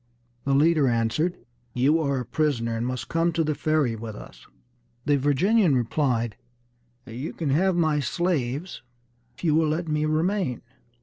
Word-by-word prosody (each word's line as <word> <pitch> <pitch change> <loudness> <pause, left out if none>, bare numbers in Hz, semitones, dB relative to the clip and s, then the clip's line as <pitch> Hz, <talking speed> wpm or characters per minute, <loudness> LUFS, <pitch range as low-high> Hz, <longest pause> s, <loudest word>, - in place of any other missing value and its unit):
The 135 0 +2
leader 155 0 +4
answered, 120 +9 0 0.4
"You 140 +6 +3
are 140 -3 0
our 125 - -2
prisoner, 120 -4 -1
and 115 +2 -2
must 125 -1 -4
come 165 +1 +1
to 165 0 +1
the 155 0 0
Ferry 150 -5 0
with 110 -1 -7
us." - - -13 0.6
The 145 - +3
Virginian 150 - +3
replied, 120 -2 0 0.7
"You 125 +5 -6
can 155 -5 -2
have 185 +6 +2
my 155 -3 +2
slaves, 150 +1 -2 0.5
if - - -16
you 160 -3 +3
will 160 0 +3
let 165 +2 -2
me 150 0 0
remain." 160 - 0
150 Hz, 160 wpm, -25 LUFS, 125-165 Hz, 0.7 s, leader